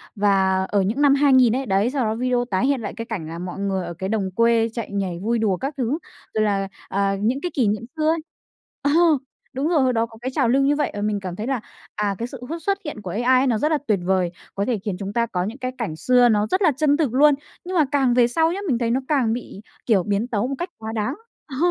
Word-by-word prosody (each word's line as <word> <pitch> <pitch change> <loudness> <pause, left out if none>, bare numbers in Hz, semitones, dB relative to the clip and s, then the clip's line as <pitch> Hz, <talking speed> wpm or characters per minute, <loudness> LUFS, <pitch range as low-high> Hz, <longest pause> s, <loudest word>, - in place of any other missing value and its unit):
và 190 -2 +2
ở 200 -1 +2
những 220 +9 -1
năm 280 -1 +6
2000 260 -4 +5
ấy. 270 0 -2
Đấy, 200 +3 +2
sau 265 -4 0
đó 215 +1 0
video 245 0 0
tái 200 +2 0
hiện 275 -3 +1
lại 205 - -5
cái 230 - -4
cảnh 190 -9 -5
là 165 +1 -6
mọi 180 +1 -6
người 195 -2 -1
ở - - -5
cái 190 +3 -5
đồng 200 -3 -1
quê 230 +2 +3
chạy 230 -2 -4
nhảy 190 -4 -2
vui 230 +3 0
đùa 200 -4 +1
các 275 +7 -3
thứ, 260 +3 0 0.4
rồi 215 - +2
là, 195 -2 0 0.2
à, 195 0 0
những 250 +6 0
cái 355 0 -3
kỷ 245 -6 +2
niệm 215 +2 -1
xưa 310 0 +2
ấy. 330 - +2 0.7
Ờ, 285 - +2 0.6
đúng 275 +4 -1
rồi, 335 -3 +3
hồi 255 -1 +3
đó 230 -1 +1
có 225 -1 -15
cái 260 - -2
trào 265 -2 +1
lưu 265 +3 +3
như 285 +1 +3
vậy 295 - 0
và 205 - -4
mình 210 -1 0
cảm 185 -2 -6
thấy 215 - -4
là, 260 -3 -1 0.4
à, 205 -1 0
cái 235 - -3
sự 255 -1 -9
x - - -5
xuất 395 -1 +2
hiện 295 -9 -6
của 185 - -6
AI 255 +2 +4
nó 230 -4 +2
rất 300 - +1
là 310 - +3
tuyệt 210 -4 +2
vời, 185 -1 +1 0.2
có 200 - -1
thể 235 -1 0
khiến 205 -4 -2
chúng 200 0 -5
ta 235 +1 +1
có 180 -5 -2
những 225 +7 -5
cái 255 -1 -3
cảnh 155 - -3
xưa 250 +5 +4
nó 210 -2 +2
rất 370 - 0
là 325 -5 +5
chân 290 0 +3
thực 290 -7 0
luôn, 295 +2 +6 0.3
nhưng 365 +1 -4
mà 315 - +5
càng 265 -4 +3
về 245 -1 +5
sau 320 +6 +2
nhớ, 385 - -3
mình 250 -5 +1
thấy 235 -1 0
nó 255 +3 +1
càng 260 -7 +2
bị, 235 -4 -6 0.3
kiểu, 210 -6 +3
biến 205 +5 -1
tấu 220 -1 0
một 275 - -2
cách 350 - -4
quá 220 0 -6
đáng. 220 +4 -1 0.3
Ờ. 275 - -8
230 Hz, 280 wpm, -22 LUFS, 200-270 Hz, 0.7 s, năm